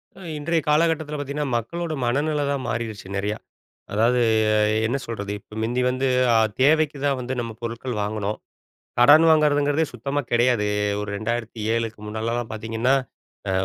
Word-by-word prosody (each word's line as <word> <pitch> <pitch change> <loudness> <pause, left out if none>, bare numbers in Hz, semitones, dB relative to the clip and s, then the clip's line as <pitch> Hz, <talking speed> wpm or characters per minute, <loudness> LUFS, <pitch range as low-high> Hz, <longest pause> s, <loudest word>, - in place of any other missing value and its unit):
அ, - - -15 0.2
இன்றைய 165 +2 0
காலகட்டத்துல 155 -1 +1
பாத்தீங்கன்னா, 145 +1 -3
மக்களோட 165 +8 -4
மனநிலை 145 +4 0
தான் 140 -2 -2
மாறிடுச்சு, 110 -4 -4
நெறையா. 105 +2 -1 0.6
அதாவது, 115 +4 +3 0.3
எ - - +3 0.3
என்ன 130 +4 0
சொல்றது, 100 -3 -5
இப்போ 105 - -19
மிந்தி 120 +3 0
வந்து 130 +1 0 0.3
அ - - +4 0.3
தேவைக்கு 150 +1 +3
தான் 140 -2 +1
வந்து 125 +1 -4
நம்ம 115 -1 -3
பொருட்கள் 115 +1 -4
வாங்குனோம். 105 0 -2 0.6
கடன் 145 +6 +7
வாங்குறதுங்குறதே 150 0 +3
சுத்தமா 140 +4 -2
கிடையாது. 120 -3 +3 0.3
ஒரு 105 - -5
2007 115 0 -2
முன்னாலலாம் 115 +2 -3
பாத்தீங்கன்னா, 115 +4 0 0.5
அ - - +1
120 Hz, 140 wpm, -23 LUFS, 110-145 Hz, 0.6 s, கடன்